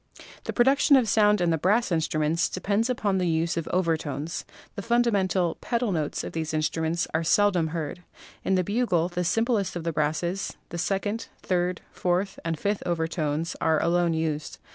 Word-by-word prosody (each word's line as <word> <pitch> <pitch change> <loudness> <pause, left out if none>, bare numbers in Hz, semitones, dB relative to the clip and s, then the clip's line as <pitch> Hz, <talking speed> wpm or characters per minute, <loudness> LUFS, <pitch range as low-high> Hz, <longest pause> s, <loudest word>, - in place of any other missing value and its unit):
The - - -2
production 275 +3 +4
of 255 -4 +4
sound 210 -1 +4
in 175 -1 +2
the 160 - +1
brass 205 +6 +2
instruments 160 0 +1
de - - -5
pends 210 +5 +1
upon 205 -6 0
the 180 - +1
use 165 0 0
of 165 -2 -3
overtones. 165 -3 -1 0.3
The 200 - -5
fundamental 200 -6 +1
("pedal") 235 -3 0
notes 155 -5 -2
of - - -6
these 160 -1 -2
instruments 160 +2 0
are 160 +1 +1
seldom 180 -1 +3
heard. 160 +1 -4 0.4
In 190 - +2
the 185 - +2
bugle, 190 -5 +1
the 180 0 -2
simplest 205 +1 +1
of 175 - -4
the 165 0 -2
brasses, 160 +5 -1
the 170 - -5
second, 205 +5 -1 0.2
third, 180 -1 0
fourth 185 +2 -1
and 165 -1 -2
fifth 205 +5 -1
overtones 160 -1 -1
are 160 -1 +3
alone 170 -1 +2
used. 155 -2 -2
175 Hz, 175 wpm, -26 LUFS, 160-200 Hz, 0.4 s, production